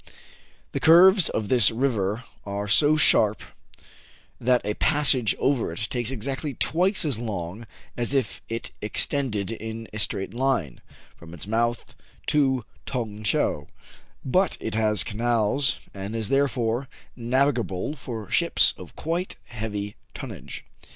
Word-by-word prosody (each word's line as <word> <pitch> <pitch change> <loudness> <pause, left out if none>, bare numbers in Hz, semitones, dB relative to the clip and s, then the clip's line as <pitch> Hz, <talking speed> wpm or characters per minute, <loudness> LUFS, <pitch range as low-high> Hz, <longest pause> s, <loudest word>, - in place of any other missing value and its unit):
The - - -2
curves 180 +3 +7
of 110 - -2
this 120 -2 +5
river 115 -3 -1 0.2
are 100 0 -4
so 145 +8 +5
sharp, 110 -8 +4 1.0
that 125 -1 +2
a 105 - -1
passage 135 -5 +4
over 135 -10 0
it 110 +7 -3
takes 120 -2 0
exactly 135 +3 -4
twice 185 - +1
as 135 -7 0
long 105 -1 -5 0.3
as 120 +1 -2
if 130 -6 -1
it 115 +1 -4
extended 110 -1 0
in 110 0 -6
a 105 - -5
straight 95 -2 -2
line 120 - -1 0.3
from 85 +1 -12
its 85 - -3
mouth 115 +3 -1 0.3
to 135 -5 +2 0.2
Tong 110 -5 -4
Tcheou; 75 -7 0 0.6
but 185 +9 +1
it 110 - -4
has 105 -3 +2
canals, 120 +4 0 0.2
and 100 +3 -6
is 110 -3 -3
therefore 130 -2 0 0.3
navigable 125 -2 0
for 115 -6 -7
ships - - +3
of - - -12
quite 170 +4 -3
heavy 105 -3 -5 0.2
tonnage. - - -8
115 Hz, 130 wpm, -25 LUFS, 105-135 Hz, 1.0 s, curves